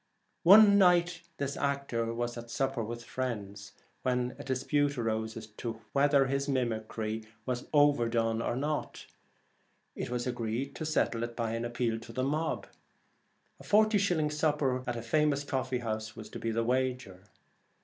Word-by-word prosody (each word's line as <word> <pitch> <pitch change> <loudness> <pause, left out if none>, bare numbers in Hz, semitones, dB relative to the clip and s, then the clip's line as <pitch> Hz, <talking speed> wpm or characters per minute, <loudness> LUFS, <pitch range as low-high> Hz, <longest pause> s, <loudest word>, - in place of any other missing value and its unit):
One 200 +3 +8
night 175 -2 +4 0.2
this 140 0 -2
actor 140 -5 -1
was 120 +1 -3
at 120 -1 -8
supper 135 0 -1
with 120 +2 -5
some - - -15
friends, 105 -5 -5 0.3
when 125 -1 0
dispute 140 +2 0
arose 110 -1 -2
as 115 - -7 0.2
to 115 -2 -4
whether 140 0 +4
his 140 +1 -1
mimicry 110 -3 -2 0.2
was 125 -1 -3
overdone 115 -6 +3
or 120 - -1
not. 145 +3 -3 0.9
It - - -4
was 120 0 -2
agreed 120 +1 -2
to 155 - -3
settle 125 -6 +1
it 120 0 -4
by 115 -2 -2
an 115 +1 -2
appeal 120 -1 -1
to 115 0 -11
the 130 +3 -2
mob. 155 +4 -1 0.9
A - - -12
forty 215 0 +4
shilling 165 -6 +1
supper 150 -4 +1
at 120 - -1
a 115 - -5
famous 145 +3 +2
coffee 130 -2 -1
house 110 0 -3
was 110 -2 -9
to - - -7
be 115 - -2
the 115 +1 0
wager. 125 -6 -1
125 Hz, 160 wpm, -30 LUFS, 115-145 Hz, 0.9 s, One